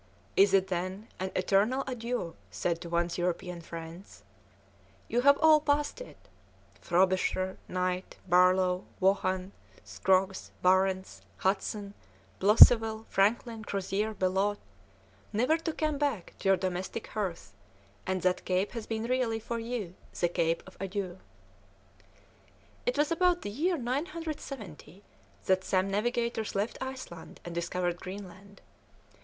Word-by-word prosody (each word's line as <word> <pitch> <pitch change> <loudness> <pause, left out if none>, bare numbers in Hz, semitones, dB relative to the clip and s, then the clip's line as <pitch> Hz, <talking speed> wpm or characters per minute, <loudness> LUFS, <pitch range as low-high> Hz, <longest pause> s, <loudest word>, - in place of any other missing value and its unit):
Is 200 0 +6
it, 190 0 +2
then, 185 +4 -3
an 190 0 -2
eternal 205 +8 +2
adieu 240 -8 -3 0.2
said 165 - -2
to 170 - -7
one's 170 +1 0
European 175 0 -2
friends? 165 +2 -9 0.8
You 240 +2 +1
have 280 +2 +6
all 315 -1 +6
passed 295 +9 0
it. - - -10 0.6
Frobisher, 185 +1 +1
Knight, 185 0 -2
Barlow, 180 +1 +4
Vaughan, 190 0 +1 0.3
Scroggs, 190 0 +1
Barentz, 190 +1 +2 0.2
Hudson, 200 +1 -1 0.5
Blosseville, 220 +2 +7
Franklin, 220 +3 +1
Crozier, 200 +2 -2
Bellot, 195 +2 +1 0.7
never 250 +9 +3
to 325 - -2
come 305 -2 -1
back 275 - -1
to 195 - 0
your 195 - +5
domestic 185 +4 -3
hearth, 195 -6 -4 0.5
and 185 -1 -1
that 180 0 +1
cape 185 +2 0
has 230 -3 -6
been 220 -1 -2
really 240 -2 0
for 230 +1 -4
you 225 -6 -4 0.3
the 175 - +3
cape 165 -1 0
of 185 - -14
adieus." 190 -2 -4 1.7
It - - +1
was 295 +2 +2
about 355 +1 +2
the 205 - -4
year 335 - 0
970 265 - -5 0.4
that 185 0 +2
some 190 +1 +1
navigators 235 +1 -1
left 205 +3 -1
Iceland 260 -11 -7
and 175 - -6
discovered 175 +1 -2
Greenland. 195 +1 -9
195 Hz, 125 wpm, -30 LUFS, 185-235 Hz, 1.7 s, Blosseville